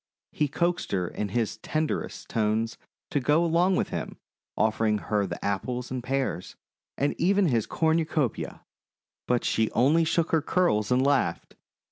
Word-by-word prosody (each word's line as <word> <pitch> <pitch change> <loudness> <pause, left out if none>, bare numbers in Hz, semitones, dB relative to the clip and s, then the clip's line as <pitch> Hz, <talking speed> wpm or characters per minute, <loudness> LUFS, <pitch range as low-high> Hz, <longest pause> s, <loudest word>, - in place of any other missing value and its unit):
He 150 - 0
coaxed 175 +5 -1
her 90 -2 0
in 105 +3 -4
his 110 +1 -1
tenderest 155 +7 -3
tones 110 0 0 0.4
to 145 - +2
go 150 +6 +3
along 175 +3 +3
with - - 0
him, - - -5 0.4
offering 110 0 +2
her 105 -1 -1
the 85 - -5
Apples 125 +6 -2
and 130 -2 -3
Pears, 130 -8 -2 0.4
and 140 +1 +1
even 195 +3 +3
his 115 -5 +1
cornucopia, 160 -5 0 0.6
but 125 -1 +1
she 110 -1 +1
only 145 +8 +4
shook 165 0 +1
her 160 - +3
curls 140 - +1
and 130 +2 +3
laughed. 140 -12 0
130 Hz, 150 wpm, -27 LUFS, 110-160 Hz, 0.6 s, only